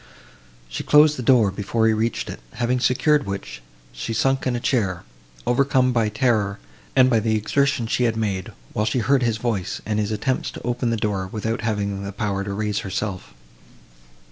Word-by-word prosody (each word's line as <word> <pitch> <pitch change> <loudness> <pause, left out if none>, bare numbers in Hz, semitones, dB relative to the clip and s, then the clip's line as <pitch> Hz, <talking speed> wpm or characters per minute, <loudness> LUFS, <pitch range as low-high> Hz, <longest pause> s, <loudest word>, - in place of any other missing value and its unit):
She - - -5
closed 150 0 +6
the 130 - -5
door, 115 -5 +4
before 105 +3 -1
he 110 - +4
reached 110 +2 -1
it, - - -7
having 125 +1 0
secured 130 +2 +2
which, 95 -10 -5 0.3
she - - -4
sunk 135 +3 +1
in 125 - 0
a - - -1
chair, 105 - 0 0.4
overcome 130 0 +3
by 115 -3 +2
terror 105 -3 +1 0.4
and 130 -1 +6
by 120 -3 +3
the 110 0 +1
exertion 130 +4 +1
she 120 +2 +1
had 115 -1 0
made, 100 -4 -2 0.2
while 105 - 0
she 110 - 0
heard 130 +3 +2
his 115 -3 +1
voice, 110 -5 -2
and 105 0 -1
his 105 -1 0
attempts 125 +5 -1
to - - -8
open 120 0 -1
the 115 - 0
door, 100 -3 -1
without 110 +1 -2
having 100 -3 -2
the 100 - -4
power 100 -1 -2
to 100 - -5
raise 105 0 -1
herself. 95 - -4
110 Hz, 190 wpm, -23 LUFS, 100-125 Hz, 0.4 s, closed